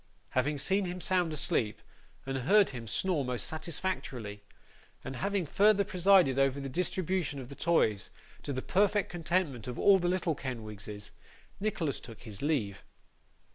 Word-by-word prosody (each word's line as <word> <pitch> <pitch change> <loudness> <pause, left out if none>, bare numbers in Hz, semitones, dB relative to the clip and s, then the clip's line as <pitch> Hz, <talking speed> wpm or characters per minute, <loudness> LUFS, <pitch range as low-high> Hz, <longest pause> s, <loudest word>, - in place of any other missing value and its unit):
Having 145 +4 +1
seen 190 +7 +1
him 180 0 -4
sound 180 -2 +1
asleep, 145 - 0 0.5
and 135 0 -3
heard 200 +10 +4
him 120 -3 -7
snore 160 - 0
most 125 -1 -2
satisfactorily, 155 - -4 0.6
and 130 -1 -6
having 200 -2 0
further 205 +5 +4
presided 185 -7 +4
over 135 0 +2
the 140 -1 -4
distribution 180 -1 -1
of 130 -2 -8
the 140 - -9
toys, 110 - +1 0.3
to - - -4
the 130 -1 -3
perfect 205 +1 +2
contentment 170 -8 -1
of 125 - -5
all 195 -1 +6
the 175 - 0
little 180 -2 +1
Kenwigses, 105 -6 -7 0.5
Nicholas 180 -9 -1
took 115 -3 -12
his 105 -4 -7
leave. 120 - -1
150 Hz, 150 wpm, -31 LUFS, 125-185 Hz, 0.6 s, all